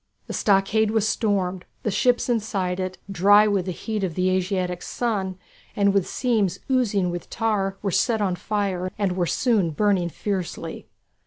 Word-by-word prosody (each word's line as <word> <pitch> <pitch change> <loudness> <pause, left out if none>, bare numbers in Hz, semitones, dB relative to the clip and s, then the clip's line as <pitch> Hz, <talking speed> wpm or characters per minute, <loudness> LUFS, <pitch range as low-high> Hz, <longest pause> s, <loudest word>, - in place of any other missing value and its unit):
The - - -6
stockade 210 +2 +2
was 220 -1 +1
stormed; 190 -5 0 0.2
the 215 - 0
ships 245 +5 +2
inside 200 -6 -1
it, 185 0 -3
dry 205 +3 +6
with 200 -3 0
the - - -1
heat 210 +4 -4
of 175 -4 -2
the 185 0 +1
Asiatic 185 -1 -1
sun, 195 -6 -2 0.4
and 200 -1 +3
with 200 -3 +2
seams 215 -8 0
oozing 205 -8 +2
with 175 0 -6
tar, 200 -4 -1
were 200 - 0
set 225 +5 +2
on 190 -3 0
fire 190 -1 -2
and 200 -3 0
were 180 -1 0
soon 215 -7 +2
burning 185 +1 +1
fiercely. 190 0 -4
195 Hz, 165 wpm, -24 LUFS, 185-215 Hz, 0.4 s, dry